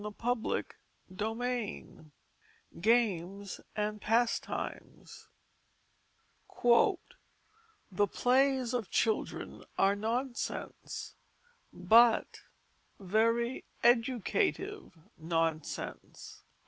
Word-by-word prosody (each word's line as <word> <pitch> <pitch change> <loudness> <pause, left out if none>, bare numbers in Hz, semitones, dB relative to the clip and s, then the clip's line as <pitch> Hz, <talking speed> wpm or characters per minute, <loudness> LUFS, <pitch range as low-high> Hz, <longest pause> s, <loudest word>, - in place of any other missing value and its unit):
CHAPTER 240 -1 -1 0.5
XVII 225 -3 -4 0.7
GAMES 200 -3 0
AND 210 0 -2
PASTIMES 230 +2 -2 1.2
_The 355 - -1
plays 260 -1 +2
of 235 -6 -2
children 220 -2 -1
are 195 +1 +4
nonsense 240 +4 -4 0.6
but 225 +6 +4 0.6
very 230 +5 +1 0.2
educative 260 - +1 0.2
nonsense. 165 -1 -3
230 Hz, 55 wpm, -31 LUFS, 200-250 Hz, 1.2 s, are